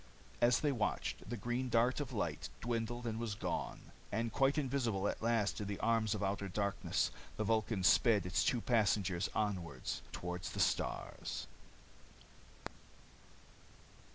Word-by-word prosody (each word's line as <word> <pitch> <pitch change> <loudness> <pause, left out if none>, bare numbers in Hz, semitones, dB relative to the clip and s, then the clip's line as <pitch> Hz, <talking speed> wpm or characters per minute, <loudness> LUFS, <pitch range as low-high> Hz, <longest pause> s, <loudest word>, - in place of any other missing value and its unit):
As 120 0 +5
they 150 - +2
watched, 105 -4 -2
the 120 - -3
green 120 +4 -1
dart 120 +3 +3
of 145 -4 -3
light - - -2
dwindled 120 +1 -2
and 115 -1 -2
was 115 -3 -2
gone. - - -4 0.2
And 115 +1 -1
quite 135 +2 +3
invisible 125 -8 0
at - - -2
last 115 -3 +1
in 105 - -3
the 100 -1 -3
arms 115 -2 +2
of 105 - -3
outer 100 0 -1
darkness, 100 +1 0 0.3
the 110 - 0
Vulcan 110 -2 +1
sped 105 0 +5
its 90 - +1
two 120 - +2
passengers 100 -6 +2
onward 90 -10 -2 0.3
toward 90 0 -4
the - - -5
stars. - - -1
110 Hz, 140 wpm, -36 LUFS, 100-120 Hz, 0.3 s, As